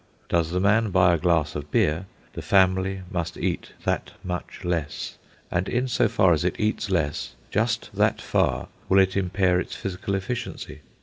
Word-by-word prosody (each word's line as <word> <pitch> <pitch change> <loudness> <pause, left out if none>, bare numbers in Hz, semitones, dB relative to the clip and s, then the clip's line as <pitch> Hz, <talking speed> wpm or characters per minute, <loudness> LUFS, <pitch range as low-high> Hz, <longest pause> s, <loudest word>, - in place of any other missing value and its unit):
Does 85 -2 +2
the 90 +2 0
man 105 +3 +3
buy 90 -1 +4
a - - +3
glass 80 -3 +2
of 75 0 -5
beer, 80 +6 +1 0.3
the - - -5
family 95 0 +2
must 85 -3 -3
eat - - -2
that - - -1
much 90 -1 -5
less; 80 -4 -3 0.3
and 90 +2 0
in 125 +2 0
so 120 - +2
far 95 -4 +4
as 80 - 0
it 90 - -1
eats 105 -1 0
less, 80 -6 -1 0.2
just 115 +2 0
that - - +2
far - - 0 0.2
will 95 - +5
it 95 -1 +4
impair 95 -1 +2
its - - -4
physical 100 +1 -3
efficiency. 95 -5 -5
95 Hz, 175 wpm, -25 LUFS, 85-100 Hz, 0.3 s, will